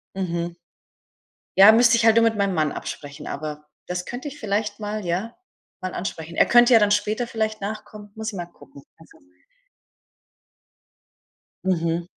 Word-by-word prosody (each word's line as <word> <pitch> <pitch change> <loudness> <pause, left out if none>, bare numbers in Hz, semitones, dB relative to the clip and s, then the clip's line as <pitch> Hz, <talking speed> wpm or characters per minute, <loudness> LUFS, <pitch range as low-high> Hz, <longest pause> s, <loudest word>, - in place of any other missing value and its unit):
Mhm. 170 -2 -3 1.0
Ja, 195 +3 +10
müsste 230 +1 +5
ich 230 - +1
halt 225 -1 +6
nur 230 - +5
mit 225 -1 +2
meinem 200 -1 +1
Mann 155 -3 +1
absprechen, 145 0 -7
aber 150 0 -6 0.2
das 180 0 -4
könnte 245 +5 -6
ich 290 +1 -9
vielleicht 210 0 -2
mal 210 -1 -4
ja, 185 +7 -2 0.5
mal 185 -1 -4
ansprechen. 170 -3 -5
Er - - +5
könnte 240 +1 +6
ja 230 - +8
dann 210 -1 +2
später 210 +3 0
vielleicht 220 -2 -2
nachkommen, 210 0 -7
muss 220 0 -6
ich - - -10
mal 175 - -4
gucken, 155 -4 -17
also 165 - -19 2.5
Mhm. 170 -2 0
205 Hz, 155 wpm, -23 LUFS, 170-220 Hz, 2.5 s, Ja